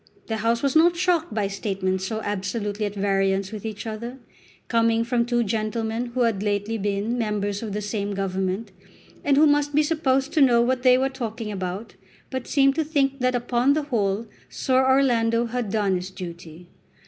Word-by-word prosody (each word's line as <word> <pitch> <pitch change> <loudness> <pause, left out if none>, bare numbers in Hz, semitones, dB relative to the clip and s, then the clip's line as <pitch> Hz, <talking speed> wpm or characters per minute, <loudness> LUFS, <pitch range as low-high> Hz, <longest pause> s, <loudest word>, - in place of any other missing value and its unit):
The 220 - -2
House 230 +3 0
was 275 +1 +1
not 340 +2 +5
shocked 350 -3 +1
by 210 -2 0
statements 190 -2 -2
so 220 +1 -3
absolutely 205 +1 -2
at 205 - -7
variance 195 -1 +1
with 215 -2 -7
each 215 -1 -5
other, 235 +3 -5 0.5
coming 230 -1 +2
from 235 0 0
two 240 -1 +2
gentlemen 225 +2 -2
who 255 - +1
had 225 -5 +1
lately 205 +2 -1
been 205 +4 -1
members 205 -2 -1
of 220 -3 -5
the 210 0 -3
same 205 -1 -3
Government, 190 +2 -2 0.5
and 280 -1 +3
who 305 - +7
must 290 -1 +2
be 305 - +5
supposed 275 -4 0
to 315 - +3
know 245 -3 +6
what 250 +2 +1
they 255 -1 +6
were 265 +1 +2
talking 225 -4 -5
about, 190 +2 -5 0.4
but 260 -2 -4
seemed 275 -1 +4
to 320 - +2
think 280 -3 0
that 255 0 +1
upon 245 +2 +2
the 305 +1 0
whole 220 -5 -1 0.2
Sir 260 0 +1
Orlando 240 -3 +3
had 235 -2 -3
done 205 -4 +1
his 180 +1 -6
duty. 170 -2 -9
225 Hz, 185 wpm, -24 LUFS, 200-255 Hz, 0.5 s, who